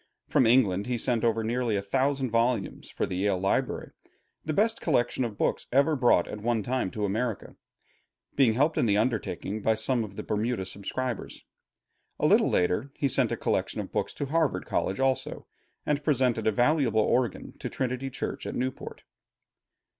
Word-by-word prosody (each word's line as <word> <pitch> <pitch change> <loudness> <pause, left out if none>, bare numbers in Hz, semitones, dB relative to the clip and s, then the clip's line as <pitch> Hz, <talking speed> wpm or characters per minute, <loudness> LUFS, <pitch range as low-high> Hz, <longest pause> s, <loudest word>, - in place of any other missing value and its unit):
From 125 - +4
England 105 -5 +3
he 125 -1 -1
sent 120 -1 0
over 115 -1 +1
nearly 120 0 0
a 100 - 0
thousand 130 +4 0
volumes 120 +1 0
for - - -2
the 90 - -4
Yale 100 0 +1
library, 95 +1 -1 0.5
the 155 - -2
best 220 +7 +1
collection 130 -4 +1
of 110 -4 -4
books - - -1
ever 140 +4 +3
brought 120 -10 +3
at 105 - -7
one 115 -1 0
time 125 -3 -1
to 105 +2 -3
America, 110 +2 -3 0.8
being 130 -5 +4
helped 145 +5 +2
in - - +2
the 100 -1 +3
undertaking 110 -3 -1
by 110 +2 +2
some 115 +2 +1
of 100 -2 -9
the - - -5
Bermuda 110 -1 -1
subscribers. 110 +5 -5 0.8
A - - +1
little - - +5
later 90 +9 +1
he 140 - 0
sent 135 - +1
a - - -1
collection - - -1
of - - -5
books - - -2
to 145 - -3
Harvard 155 +1 0
College 95 - -1
also, 135 -1 -1 0.4
and 150 0 0
presented 130 -7 +1
a - - +4
valuable 120 -1 +2
organ 120 -1 0
to - - -4
Trinity 130 +1 -2
Church 130 - -5
in - - -4
Newport. 130 +1 -4
120 Hz, 175 wpm, -27 LUFS, 105-130 Hz, 0.8 s, little